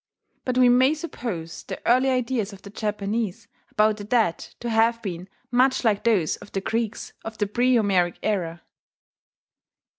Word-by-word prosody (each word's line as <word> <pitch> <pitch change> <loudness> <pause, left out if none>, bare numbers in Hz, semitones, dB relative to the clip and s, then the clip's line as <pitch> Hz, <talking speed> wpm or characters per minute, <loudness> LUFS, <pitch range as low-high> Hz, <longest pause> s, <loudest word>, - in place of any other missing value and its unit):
But 255 -1 -1
we 255 -1 +6
may 255 +4 +5
suppose 230 - -5
the - - -7
early 255 +3 +4
ideas 250 -4 0
of 195 - -13
the 200 - -10
Japanese 210 -1 -2 0.2
about 215 0 +2
the 205 - -7
dead 215 -5 +2 0.2
to 240 - -5
have 225 +1 +3
been 180 -2 -5 0.2
much 255 +2 +3
like 210 -3 +2
those 200 -9 +2
of - - -14
the 195 - -1
Greeks 225 +1 -2
of 225 0 -7
the 205 - +1
pre 245 +5 +2
Homeric 185 -5 +2
era. 175 -6 -1
220 Hz, 160 wpm, -24 LUFS, 195-245 Hz, 0.2 s, we